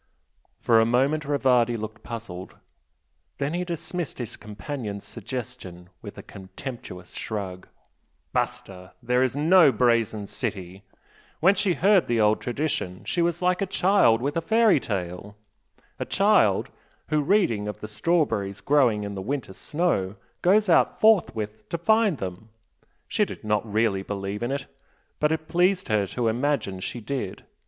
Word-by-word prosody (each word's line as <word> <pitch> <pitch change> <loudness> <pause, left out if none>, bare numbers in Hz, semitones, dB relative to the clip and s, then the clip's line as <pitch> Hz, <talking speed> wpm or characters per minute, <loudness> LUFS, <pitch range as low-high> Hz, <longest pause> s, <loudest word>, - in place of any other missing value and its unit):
For 115 -2 +4
a - - +5
moment 135 +6 +1
Rivardi 125 -4 +2
looked 110 0 -7
puzzled, 110 -6 -8 0.8
then 140 +2 -2
he 175 +1 -1
dismissed 175 -1 -4
his 120 -4 -6
companion's 105 -1 -6
suggestion 115 -7 -7
with - - -10
a - - -8
contemptuous 95 -1 -9
shrug. 95 -4 -5 0.7
"Basta! 90 -1 -3
There 125 +1 +2
is 130 -1 +1
no 160 +1 +6
'Brazen 115 -3 +1
City'! 95 -1 -5 0.6
When 185 +5 +5
she 190 -2 +1
heard 195 0 +4
the 120 -1 +1
old 105 0 +3
tradition 120 -8 -3
she 175 - 0
was 170 +1 0
like 180 +1 +2
a 195 - 0
child 180 - +3
with 145 +2 -1
a 165 - +1
fairy 220 -2 +4
tale 95 -1 -5 0.6
a - - -2
child - - +3 0.4
who, 155 -1 +2
reading 140 - +2
of 105 - -5
strawberries 110 - 0
growing 125 -8 +3
in 100 0 -5
the 95 - -5
winter 125 -1 -4
snow, 110 - -1 0.3
goes 205 +4 +4
out 170 - +3
forthwith 110 - +2
to 170 - -2
find 215 0 +3
them 95 +2 -6 0.6
she - - +1
did - - -6
not 105 0 -1
really 105 -2 +1
believe 100 +1 -4
in 120 +2 -1
it 140 0 -3 0.5
but 150 0 +2
it 155 0 -2
pleased 180 +2 +2
her 105 -2 +2
to 120 +4 -2
imagine 120 -5 0
she 120 - -5
did. 120 -3 -5
120 Hz, 150 wpm, -25 LUFS, 105-155 Hz, 0.8 s, no